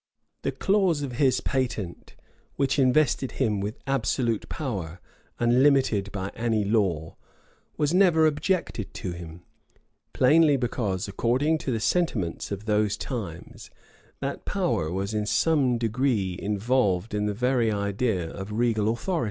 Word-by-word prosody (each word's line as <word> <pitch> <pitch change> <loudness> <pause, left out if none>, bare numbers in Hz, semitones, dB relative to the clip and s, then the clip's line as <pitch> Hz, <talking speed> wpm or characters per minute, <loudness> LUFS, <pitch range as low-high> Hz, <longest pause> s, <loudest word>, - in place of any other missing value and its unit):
The - - -1
clause 190 -7 +1
of 135 - -4
his 135 -3 +3
patent, 120 -9 -3 0.4
which 140 +1 +1
invested 130 0 +2
him 110 -6 0
with 105 +6 -4
absolute 130 -4 0
power, 95 - -4 0.4
unlimited 120 -4 +3
by 95 -1 -4
any 115 -3 0
law, 95 -7 0 0.6
was 150 +2 +1
never 175 -4 +5
objected 155 - -1
to 90 - -4
him; 85 0 -9 0.7
plainly 150 +2 +4
because, 110 -7 -2
according 130 +10 +1
to 135 - -3
the 115 - -1
sentiments 110 - -1
of 100 +1 -5
those 105 -1 +1
times, 100 - -6 0.5
that - - -4
power 80 0 -1
was 100 +3 -2
in 105 -1 -1
some 135 +1 +2
degree 115 -5 0
involved 105 -2 0
in 105 0 0
the 105 - -2
very 125 -1 +1
idea 100 -2 -1
of 95 +4 -7
regal 110 -1 +1
authority. 165 +10 -1
115 Hz, 135 wpm, -26 LUFS, 100-135 Hz, 0.7 s, never